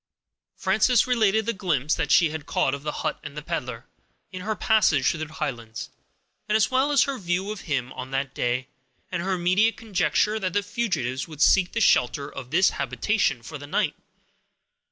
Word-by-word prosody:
Frances 215 +5 +3
related 220 -4 +2
the 230 - 0
glimpse 150 -7 0
that 150 - -1
she 165 -4 +5
had 155 -2 -6
caught - - +1
of 140 - -4
the 150 +1 -3
hut - - -1
and 150 0 -9
peddler, 125 -8 -4 0.5
in 185 -1 -7
her 215 +3 -2
passage 180 -14 +3
through 165 - -5
the 155 0 -9
Highlands, 115 -6 -5 0.6
as 215 +2 +3
well 265 +3 +2
as 285 - +5
her 275 -2 -3
view 185 +2 -1
of 215 - -6
him 130 -4 -1
on 130 - -7
that 135 0 -2
day, 125 +2 -1 0.4
and 180 -2 -2
her 190 +2 -1
immediate 185 +5 +2
conjecture 215 0 +1
that 185 -4 -2
the 205 - +1
fugitives 145 - -2
would 155 -3 -11
seek 180 +3 +4
the 230 - -1
shelter 140 - +3
of 135 -3 -9
this 185 +6 +4
habitation 165 - 0
for 150 +4 -8
the 145 - -9
night. - - 0
175 Hz, 185 wpm, -25 LUFS, 140-215 Hz, 0.6 s, she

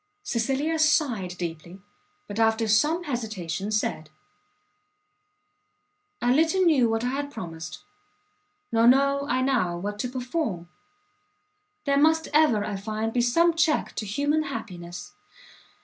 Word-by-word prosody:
Cecilia 275 - -1
sighed 240 - +1
deeply, 170 +1 -6 0.5
but, 205 +2 -5
after 225 0 +2
some 300 +11 +2
hesitation, 210 - -4
said, 210 -7 -2 2.1
"I 245 - +2
little 325 +6 +3
knew 285 -9 +4
what 225 +1 -1
I 245 - 0
had 285 +2 -3
promised, 165 - -8 0.9
nor 230 0 +4
know 275 +2 +3
I 255 +1 +1
now 230 -11 +1
what 205 +3 -5
to 250 - -2
perform! 250 - -3 1.2
there 280 -1 +2
must 320 +2 +3
ever, 290 -9 +4
I 205 - -3
find, 215 +2 -3
be 245 - +2
some 335 +8 +3
check 320 -2 +1
to 215 - -3
human 290 +9 +1
happiness! 180 - -7
240 Hz, 125 wpm, -26 LUFS, 205-285 Hz, 2.1 s, knew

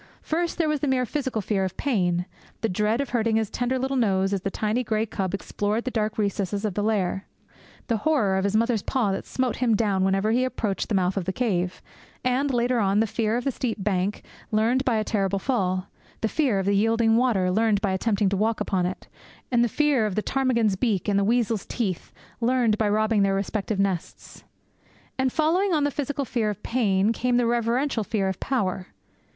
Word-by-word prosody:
First 340 +2 -1
there 330 -2 +1
was 305 -1 0
the 290 - -1
mere 260 -1 +2
physical 260 -5 -2
fear 195 -1 0
of 185 -1 -4
Pain; 180 -9 0 0.4
the 225 - 0
dread 210 +6 +1
of 280 - -4
hurting 230 -2 +1
his 220 -2 0
tender 245 +1 -1
little 265 +1 -1
nose 195 -4 +2
as 195 - -1
the 195 - -2
tiny 215 +5 -1
grey 220 -1 0
cub 195 -3 -2
explored 210 +3 -2
the 255 - -3
dark 215 -2 -1
recesses 200 0 -1
of 210 - -1
the 205 - -1
lair; 200 -3 0 0.6
the 230 - 0
horror 220 -7 +1
of 190 - 0
his 200 +1 0
mother's 230 -1 +2
paw 230 -4 0
that 195 - -4
smote 255 -1 -1
him 240 -3 +2
down 200 -3 +1
whenever 195 +3 +2
he 250 +3 +2
approached 215 -6 -2
the 215 - +1
mouth 185 0 +1
of 190 - -1
the 190 - -1
cave; 185 -6 -1 0.4
and, 260 +3 +1
later 245 0 +1
on, 200 -1 +2
the 225 - +3
fear 225 +1 0
of 245 - -3
the 275 - 0
steep 225 -5 -3
bank, 195 0 -1 0.3
learned 230 +5 +2
by 250 -4 +1
a 215 - +1
terrible 200 -3 0
fall; 185 -5 0 0.4
the 225 - +1
fear 255 -4 +1
of 195 - -1
the 200 - +2
yielding 225 +2 +3
water, 225 -7 +2
learned 215 +1 +2
by 200 -2 0
attempting 200 +1 +1
to 195 - +1
walk 220 +3 0
upon 180 -2 0
it; 185 - -7 0.4
and 240 -1 +4
the 240 - +1
fear 280 -4 +2
of 200 - -4
the 215 - 0
ptarmigan's 240 -6 +1
beak 205 -2 0
and 200 -1 +2
the - - +2
weasel's 225 -1 +1
teeth, 195 -8 -3 0.3
learned 240 -2 +2
by 215 -2 +2
robbing 215 0 +2
their 195 0 +2
respective 200 +1 -2
nests. 195 -4 -3 0.8
And 260 -1 +2
following 345 +6 +2
on 300 - +1
the 290 - +1
physical 285 0 -2
fear 230 -3 -1
of 205 - -6
Pain 210 -3 +1
came 245 +1 +1
the 245 - +2
reverential 235 +1 0
fear 205 -2 -1
of 190 -1 -3
Power. 190 -8 -1
220 Hz, 215 wpm, -25 LUFS, 195-245 Hz, 0.8 s, and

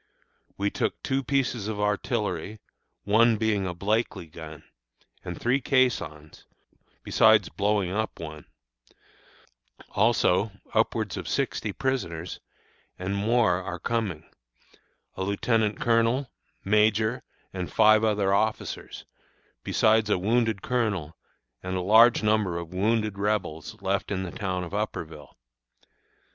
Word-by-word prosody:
We 100 0 0
took - - -2
two 135 +1 0
pieces 130 -4 -1
of 110 -1 -4
artillery, 105 -2 -2 0.4
one 110 +2 +4
being 105 -3 0
a 90 - -3
Blakely 105 0 -1
gun, 80 -1 -10 0.6
and - - -6
three 125 +3 +1
caissons, 120 - -1 0.6
besides 110 -5 +4
blowing 100 -2 0
up 110 +3 -3
one; 75 -2 -8 1.5
also, 105 -2 +2 0.2
upwards - - 0
of - - -6
sixty - - -1
prisoners, 90 -11 -3 0.6
and 95 +2 -3
more 105 -3 +2
are 95 -1 -5
coming; 95 -6 -2 0.9
a - - -6
lieutenant 105 +2 0
colonel, 120 +1 +1 0.3
major, 110 +4 +2 0.3
and 90 -2 -4
five 110 0 +5
other 105 -3 +2
officers, 110 +2 -2 0.6
besides 110 0 +3
a 105 - +3
wounded 110 +1 0
colonel 105 -11 -1 0.5
and 95 0 -4
a 90 - -1
large 110 +5 +6
number 105 -5 +1
of 85 0 -7
wounded 105 +1 0
Rebels 100 -7 -2
left 100 +1 -1
in 95 -1 -1
the 90 - -6
town 95 -2 -3
of 90 - -8
Upperville. 80 -8 -5
105 Hz, 120 wpm, -26 LUFS, 90-110 Hz, 1.5 s, large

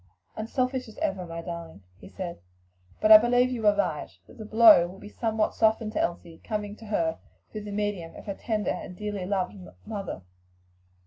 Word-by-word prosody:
"Unselfish 255 +3 -2
as 220 - -14
ever, 185 -2 -2
my 165 0 -6
darling," 165 - -8 0.2
he - - -12
said, 180 -3 -6 0.6
"but 215 - +3
I 215 - +13
believe 245 +2 +3
you 225 -4 -1
are 205 - +6
right 155 -7 -1 0.2
that - - -17
the 215 - -6
blow 215 -5 +7
will 185 +2 -11
be 205 +1 -11
somewhat 220 -1 -1
softened 220 0 +2
to - - -2
Elsie 170 -1 -4
coming 210 -2 -4
to 225 - -12
her 165 -6 0 0.3
through 210 -1 -6
the 205 - -6
medium 200 -5 -3
of - - -11
her 200 - -3
tender 215 +1 -2
and 180 0 -6
dearly 205 -3 -4
loved 190 -2 -1 0.3
mother." 200 - -5
205 Hz, 190 wpm, -27 LUFS, 180-220 Hz, 0.6 s, I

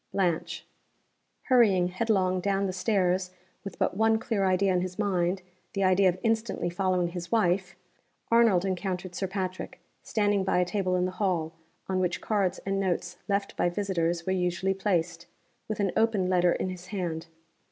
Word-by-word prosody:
Blanche." 175 -3 -1 0.8
Hurrying 205 -9 +4
headlong 185 -2 +1
down 195 +1 0
the 185 - -2
stairs 185 -1 +1 0.3
with 195 - -7
but - - 0
one 220 +2 +3
clear 220 -2 -1
idea 190 +1 +2
in 180 - +2
his 185 0 -5
mind 185 -3 0 0.3
the 195 - 0
idea 185 0 +4
of 180 - -2
instantly 220 -6 0
following 180 -1 0
his 175 0 -7
wife 190 -4 +1 0.6
Arnold 225 -6 +4
encountered 185 -1 -3
Sir 190 - -2
Patrick, 185 -1 -4 0.2
standing 205 -2 +1
by 190 - +1
a 180 - +3
table 185 -1 -1
in 180 0 +1
the 185 - -2
hall, 180 -5 -1 0.3
on 185 -1 0
which 180 -1 0
cards 195 -4 0
and 195 0 0
notes 175 -2 -2
left 200 -1 -1
by 175 - +1
visitors 175 -3 -1
were 185 - 0
usually 180 +1 0
placed, 175 -3 -1 0.4
with 215 - -4
an 200 -3 +1
open 220 -4 +2
letter 180 -1 +3
in 185 - -2
his 185 0 -8
hand. 170 -5 -4
185 Hz, 170 wpm, -28 LUFS, 180-200 Hz, 0.8 s, Hurrying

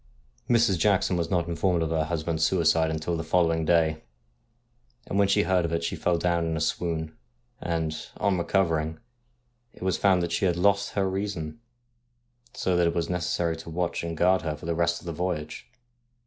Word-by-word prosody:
Mrs. 115 -7 +3
Jackson 95 0 +2
was 85 -1 -1
not 85 -3 0
informed 85 0 +1
of 80 - -2
her 80 -1 +1
husband's 80 -1 -2
suicide 80 -3 +3
until 80 +2 -2
the 80 - -3
following 80 -1 +1
day, 80 -2 +2 1.0
and 100 - -1
when 100 - +4
she 100 - +3
heard 90 0 +2
of 85 - -2
it 85 0 -1
she 85 - -2
fell 90 -1 +1
down 85 0 +1
in 80 -1 -1
a - - -2
swoon; 80 0 -2 0.5
and, 80 -2 -2
on 100 -1 +1
recovering, 80 -3 0 0.8
it - - -10
was 95 -2 0
found 95 -3 +3
that 85 - -3
she 85 +3 0
had 90 -2 +1
lost 100 +2 +2
her 100 -1 +1
reason, 95 -3 -4 1.0
so 95 - 0
that 90 -1 +3
it 85 - -1
was 85 0 -1
necessary 85 -1 -1
to 80 0 -9
watch 85 +1 -2
and 85 -1 -4
guard 90 +2 +3
her 80 -2 -3
for 75 - -11
the 85 - 0
rest 85 0 0
of - - -16
the 85 - -4
voyage. 80 -2 -4
85 Hz, 195 wpm, -26 LUFS, 80-90 Hz, 1.0 s, when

